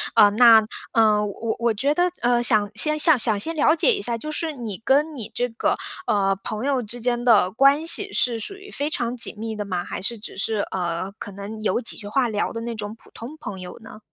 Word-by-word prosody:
呃， 210 -2 +7
那 225 0 +6 0.3
呃， 215 -2 +3
我 220 +2 -4
我 235 -1 +1
觉 275 +8 0
得， 355 +2 +2
呃， 240 0 +2
想 215 -3 +3
先 305 +8 +2
想 305 -4 +5 0.2
先 325 +11 -1
了 310 +1 +3
解 440 +8 +3
一 405 - -3
下， 235 -1 -2
就 305 +6 -6
是 315 0 -3
你 225 -6 -7
跟 295 +4 +2
你 225 -5 -7
这 245 0 -1
个， 225 - -1 0.3
呃， 195 -2 +2
朋 215 +2 -5
友 270 -3 +1
之 230 +2 -6
间 240 0 -1
的 205 -6 +4
关 275 +6 +3
系 400 +4 +1
是 235 -2 +1
属 310 - -4
于 400 +1 -13
非 290 +2 -3
常 240 -4 -3
紧 230 - 0
密 220 0 -5
的 205 - -4
吗？ 180 -3 -3
还 - - -6
是 230 +4 -1
只 205 - -10
是， 215 +1 -1
呃， 180 +1 -3
可 205 - -7
能 205 +2 -8
有 215 +3 0
几 230 - +2
句 205 - -8
话 250 +3 +1
聊 210 -1 -2
的 230 - -5
那 235 0 -5
种 210 0 -6
普 - - -22
通 250 +7 -9
朋 200 -9 -7
友 180 -1 -9
呢？ 220 -1 -12
230 Hz, 255 characters per minute, -22 LUFS, 210-275 Hz, 0.3 s, 呃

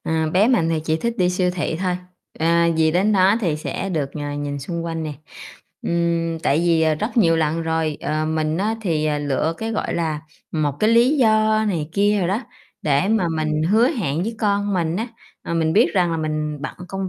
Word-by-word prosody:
Ờ, 160 -1 0
bé 195 +7 +3
mình 220 -11 +2
thì 165 -1 0
chỉ 160 0 +1
thích 235 +8 -2
đi 180 -1 +3
siêu 180 0 +1
thị 175 -3 -2
thôi, 180 -1 0 0.4
ờ, 160 - 0 0.3
vì 160 0 +3
đến 190 +6 +2
đó 195 +2 +4
thì 165 -7 0
sẽ 190 +5 -4
được, 145 -5 -2
ờ, 145 -1 -4
nhìn 145 0 -4
xung 170 +4 -4
quanh 165 -1 -3
nè. 155 - -4 0.7
Ừm, 170 -1 0
tại 145 - +2
vì, 165 -1 +2
ờ, 160 -1 +3
rất 215 +9 -4
nhiều 165 -8 +4
lần 160 +1 0
rồi, 160 -2 -1
ờ, 155 +1 -1
mình 155 0 -1
á 215 +3 0
thì, 160 -6 0
à, 150 -1 0
lựa 145 +3 -1
cái, 225 0 -3
gọi 215 - -2
là, 160 -3 -1 0.3
một 150 -3 0
cái 215 - +4
lý 240 +6 +4
do 215 -2 +3
này 160 -6 -2
kia 205 +1 +2
đồ 180 - +1
đó, 195 +6 0 0.4
để 150 +6 +2
mà 215 -5 +2
mình 155 0 0
hứa 215 +9 +4
hẹn 175 - -2
với 225 +4 -3
con 205 -1 0
mình 170 -2 0
á, 225 +4 -3 0.3
à, 170 - -4
mình 160 -1 +1
biết 170 - +4
rằng 180 -3 +2
là 165 - -1
mình 155 -1 -2
bận - - -5
công 195 -1 -3
165 Hz, 225 wpm, -21 LUFS, 155-200 Hz, 0.7 s, đó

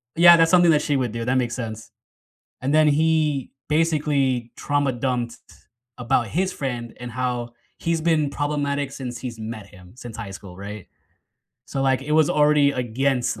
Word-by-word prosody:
"Yeah, 170 +1 +9
that's 165 0 +4
something 175 -2 +6
that 150 -2 +3
she 145 - 0
would 125 -4 -1
do. 115 0 -4
That 125 +2 +1
makes 120 -2 -1
sense." 110 -3 -6 0.7
And 135 - -1
then 155 0 +5
he 155 -2 +1 0.2
basically 145 -6 +1
trauma-dumped 125 -4 -1 0.6
about 120 -1 +1
his 185 - -1
friend 120 -4 -4
and 125 -1 -7
how 125 -1 -2 0.3
he's 165 -1 -1
been 155 -3 +2
problematic 145 -1 -2
since 125 -3 -6
he's 120 -3 -7
met 110 -2 -7
him, 90 -1 -16
since 120 -3 -9
high 110 -4 -6
school, 95 -2 -11
right? 100 0 -8 0.8
So, 135 - -3
like, 135 -1 +2
it 150 +2 -4
was 155 -1 +4
already 150 -1 +4
against 125 -1 -1
130 Hz, 165 wpm, -23 LUFS, 120-150 Hz, 0.8 s, Yeah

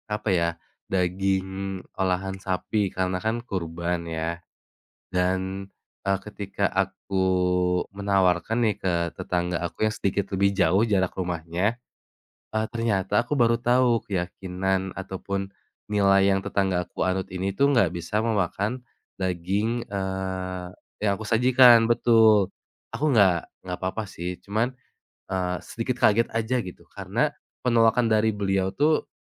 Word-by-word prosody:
Apa 105 0 -2
ya, 85 -2 +2 0.4
daging 95 +1 -1 0.2
olahan 95 0 0
sapi 95 +2 -1
karena 90 0 -1
kan 110 +3 -1
kurban 85 -3 -3
ya 80 +1 -3 0.7
dan, 95 +1 -1 0.3
eee, 95 0 +1
ketika 100 -1 -3
aku 95 0 -1 0.7
menawarkan 100 0 +1
nih 110 -4 +2
ke 95 -3 -1 0.2
tetangga 90 -1 -1
aku 85 +5 -1
yang 110 - -1
sedikit 100 -1 -1
lebih 100 +1 +3
jauh 95 +2 +3
jarak 95 -4 +1
rumahnya, 90 +5 -2 0.7
eee, 110 0 +1
ternyata 105 -3 +1
aku 125 - -3
baru 115 -1 +4
tahu 120 -1 +2
keyakinan 95 0 -2
ataupun 95 0 -4 0.4
nilai 100 -1 +4
yang 95 - 0
tetanggaku 95 -2 -1
anut 95 0 -1
ini 95 +1 -2
tuh 140 +6 +4
nggak 115 -9 +4
bisa 85 +4 -2
memakan, 110 +2 -1 0.3
daging, 95 +6 -1
eee, 95 -2 -3 0.3
yang 105 -1 +2
aku 110 - -7
sajikan, 120 0 +6
betul, 110 -4 +5 0.4
aku 155 +2 0
nggak 95 - +4 0.2
nggak 90 -1 -4
apa-apa 95 +4 -2
sih 90 -1 -6
cuman, 110 +4 0 0.6
eee, 90 -1 -1
sedikit 120 +2 -3
kaget 115 +2 +5
aja 115 +3 +1
gitu 95 -6 -7
karena - - -1 0.3
penolakan 115 -1 +3
dari 110 0 +3
beliau 95 -2 0
tuh, 150 +2 +2
95 Hz, 125 wpm, -25 LUFS, 95-110 Hz, 0.7 s, sajikan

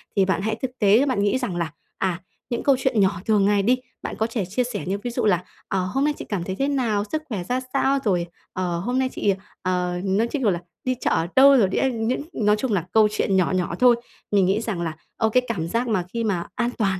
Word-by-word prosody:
Thì 195 -2 +4
bạn 190 0 0
hãy 220 +1 -1
thực 260 - -2
tế, 215 +6 +5
bạn 245 -7 0
nghĩ 205 +5 +2
rằng 245 -9 -3
là, 170 -2 -2 0.3
à, 185 -2 -1 0.3
những 240 - -2
câu 275 - +5
chuyện 255 -4 +1
nhỏ 190 -3 +2
thường 210 -3 +3
ngày 205 0 +3
đi, 250 +5 +3 0.2
bạn - - -5
có 220 - 0
thể 225 -4 -2
chia 210 +8 -1
sẻ 245 +1 -4
như 195 +2 0
ví 245 - -2
dụ - - -1
là, 180 -4 +3 0.2
ờ, 190 -1 0
hôm 270 +9 0
nay 300 - +2
chị - - -7
cảm 190 -5 -2
thấy 190 +1 -4
thế 275 - +2
nào, 235 -8 +1
sức 310 0 -1
khỏe 195 -6 -3
ra 250 +7 -1
sao, 275 0 +2
rồi, 180 -5 +1 0.3
ờ, 175 -2 -2
hôm 245 +7 -1
nay 260 - +1
chị, 200 - +1 0.3
ờ, 180 -1 -1
nói 200 +4 +1
chung, 275 +3 -3
kiểu 215 - +3
là, 175 - -1 0.2
đi 255 0 0
chợ - - +1
ở 165 - +1
đâu 275 +1 +8
rồi, 210 -6 +4
đi - - -2
ăn 235 -4 0
những 255 - 0
nói 210 -1 +3
chung 250 +3 -2
là 175 -3 0
câu 220 -1 +5
chuyện 200 -2 0
nhỏ 185 -2 +2
nhỏ 175 -2 -1
thôi. 250 -1 +6 0.4
Mình 200 -2 +4
nghĩ 195 +4 +1
rằng 200 -7 -3
là, 165 -2 -3 0.2
ờ, 220 -1 +2
cái 250 +3 +3
cảm 170 -8 -2
giác 235 +6 -1
mà 190 -6 0
khi 230 -1 -1
mà 185 -6 -1
an 240 -1 0
toàn 195 -4 +1
210 Hz, 270 wpm, -23 LUFS, 185-245 Hz, 0.4 s, đâu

